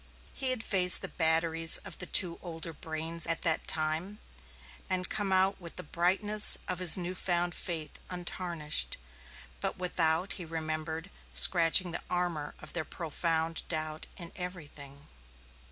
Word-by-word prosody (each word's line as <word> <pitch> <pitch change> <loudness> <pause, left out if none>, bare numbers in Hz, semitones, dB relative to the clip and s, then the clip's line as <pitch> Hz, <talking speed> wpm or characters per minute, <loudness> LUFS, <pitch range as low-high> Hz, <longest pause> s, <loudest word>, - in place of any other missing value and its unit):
He 265 - -1
had 255 -3 -2
faced 180 -4 +6
the - - -2
batteries 165 0 +2
of - - -10
the 180 - -7
two 175 -3 +3
older 165 -2 -8
brains 160 +2 -3
at 165 -1 -2
that 165 -3 -1
time, 160 +6 -2 0.7
and 185 -1 +1
come 205 -2 -3
out 190 +1 +1
with 170 -1 -10
the 180 - -7
brightness 195 +6 +6
of 180 - -3
his 180 -1 +6
new 180 0 -5
found 175 -1 -2
faith 160 -5 -6
untarnished, 175 -3 -2 0.6
but - - -5
without, 175 0 0
he 180 - -8
remembered, 160 +2 -6 0.2
scratching 175 0 +4
the 170 - -5
armor 175 -5 -4
of 155 - -12
their 175 - -3
profound 165 0 -3
doubt 155 -1 -6
in 170 -2 -9
everything. 150 -6 -9
170 Hz, 145 wpm, -29 LUFS, 160-180 Hz, 0.7 s, faced